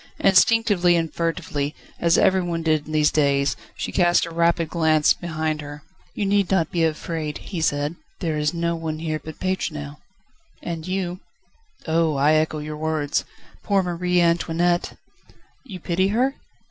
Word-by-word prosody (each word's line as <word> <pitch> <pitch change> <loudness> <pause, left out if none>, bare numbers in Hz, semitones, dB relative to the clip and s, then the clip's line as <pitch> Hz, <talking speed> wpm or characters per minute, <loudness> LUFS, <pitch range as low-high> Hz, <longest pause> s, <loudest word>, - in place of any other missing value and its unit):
Instinctively 195 -2 +4
and 165 -1 -1
furtively, 150 -3 -2 0.2
as 170 0 +3
everyone 175 -3 +2
did 155 -2 +1
in - - -7
these 150 -1 +3
days, 140 -2 +2 0.2
she - - -4
cast 175 -2 +3
a 170 - -8
rapid 170 0 +2
glance 160 -3 +3
behind 160 -2 -3
her. 145 0 -9 0.3
"You 205 - -1
need 200 -1 +2
not 170 -5 +1
be 170 -2 +1
afraid," 155 -1 -2
he 180 -5 -6
said; 145 +1 0 0.2
"there 165 -4 -1
is 150 0 0
no 170 0 -1
one 160 -1 -4
here 155 -1 -3
but 160 -1 -9
Pétronelle." 150 -6 -3 0.7
"And 165 -1 -5
you." 185 -1 -2 0.7
"Oh! 160 -1 +1
I 145 +3 +3
echo 155 0 +1
your 150 0 -6
words. 155 -2 -1 0.4
Poor 200 -2 +1
Marie 180 0 0
Antoinette!" 170 0 +1 0.7
"You 200 -9 -9
pity 180 +3 0
her?" 250 +7 +1
165 Hz, 155 wpm, -23 LUFS, 155-175 Hz, 0.7 s, Instinctively